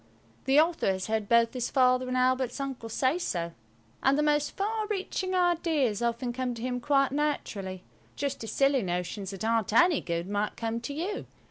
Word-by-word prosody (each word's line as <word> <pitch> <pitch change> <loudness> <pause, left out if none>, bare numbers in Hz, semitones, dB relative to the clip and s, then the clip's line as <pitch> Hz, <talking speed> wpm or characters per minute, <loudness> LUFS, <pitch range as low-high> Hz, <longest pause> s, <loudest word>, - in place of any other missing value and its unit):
The 270 +3 +5
author 330 +1 +2
has 190 0 -4
heard 220 -2 -2
both 235 0 +4
his 250 -2 -2
Father 255 -1 +3
and 255 0 -1
Albert's 255 +1 +1
uncle 265 -4 -5
say 260 +8 +1
so. 170 - -2 0.5
And 270 +1 +3
the 300 - +2
most 295 -1 +1
far 430 +2 -1
reaching 380 -2 -2
ideas 325 - +1
often 235 +1 -1
come 250 -1 -2
to 230 - -8
him 250 -1 -1
quite 275 0 +2
naturally–just 270 -3 -4
as 225 - -5
silly 275 -1 +3
notions 180 +1 -3
that 195 +2 -5
aren't 225 -2 +1
any 340 +6 +5
good 170 +1 -3
might 205 +1 -2
come 230 0 -2
to 280 - -5
you. 370 +7 -3
255 Hz, 180 wpm, -28 LUFS, 225-295 Hz, 0.5 s, The